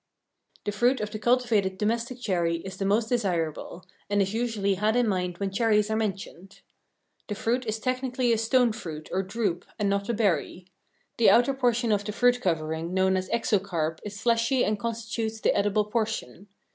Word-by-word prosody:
The 205 - 0
fruit 240 +5 +2
of 210 -1 -3
the 215 - -5
cultivated 225 -5 +2
domestic 230 +4 -1
cherry 175 -7 0
is 190 -1 -7
the 195 - -2
most 220 +3 +1
desirable 175 -6 -2 0.2
and 205 0 +1
is 195 +1 +1
usually 225 -4 0
had 210 +4 +1
in 245 -1 +3
mind 180 -3 -1
when 195 0 -2
cherries 210 +1 +2
are - - +1
mentioned. 195 -3 -4 0.7
The 205 - -3
fruit 235 +3 -1
is 215 0 -1
technically 255 +1 0
a - - +2
stone 240 +1 +3
fruit 155 -7 -7
or 190 - +1
drupe 195 -2 -2
and 205 -3 0
not 200 +1 -1
a 235 - +1
berry; 190 -4 0 0.5
the 230 - +6
outer 245 +3 +5
portion 245 -3 +1
of 205 -1 +1
the 210 0 -5
fruit 245 +2 +3
covering 165 -2 -2
known 190 0 +3
as 185 0 -2
exocarp 185 -8 0
is 205 -1 -7
fleshy 235 +3 +2
and 210 -1 -1
constitutes 225 0 -3
the - - +2
edible 205 +1 +2
portion. 210 - -3
210 Hz, 185 wpm, -27 LUFS, 190-235 Hz, 0.7 s, the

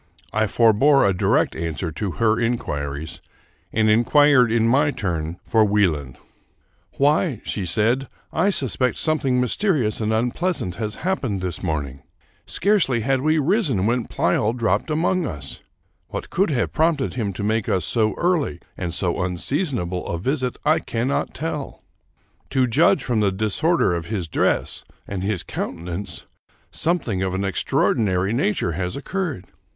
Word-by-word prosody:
I 110 0 +2
forbore 115 +5 +4
a 100 - +2
direct 90 - +1
answer 80 +1 -3
to 95 +3 -3
her 115 -1 +2
inquiries, 75 -11 -3 0.5
and 110 0 +2
inquired, 125 +3 +5
in 115 -1 +3
my 140 +5 +3
turn, 85 - -3
for 110 -1 +3
Wie 105 0 +3
land. 70 -6 -3 0.4
'* 85 +2 -41
Why," 145 - +2
said 110 +6 +1
she, 135 - -9
" - - -37
I - - +4
suspect 130 - 0
something 135 -5 +1
mysterious 125 - +1
and 110 0 0
unpleasant 120 - -1
has 110 -2 -3
happened 130 - -1
this 90 -2 -4
morning. 70 -4 -3 0.5
Scarcely 180 - +2
had 135 +3 +1
we 155 +3 +2
risen 150 - +1
when 120 +1 0
Pleyel 110 +2 +1
dropped 115 -2 0
among 165 +2 +1
us. 70 - -7 0.5
What - - -6
could 195 0 +2
have 130 -6 -1
prompted 160 -4 +1
him 110 -5 -2
to 100 - -5
make 110 +1 0
us 90 -4 +1
so 110 -2 +1
early 175 -4 0 0.2
and 85 -3 -4
so 90 -1 -1
unseasonable 90 - -2
a 85 - -2
visit 130 - -1
I 155 +1 +4
cannot 120 +4 -2
tell. 150 -2 -5 0.7
To 130 -2 +2
judge 130 +2 +3
from 120 -3 0
the 100 -2 +2
disorder 110 - +1
of 85 -1 -3
his 100 -6 -3
dress, - - 0 0.2
and 100 -2 -4
his 95 -2 -1
countenance, 85 +5 -5 0.5
something 145 - -1
of 95 -1 -1
an 95 +1 -1
extraordinary 95 +1 +1
nature 105 -8 0
has 90 - -3
occurred. 155 - -3
110 Hz, 155 wpm, -22 LUFS, 95-140 Hz, 0.7 s, inquired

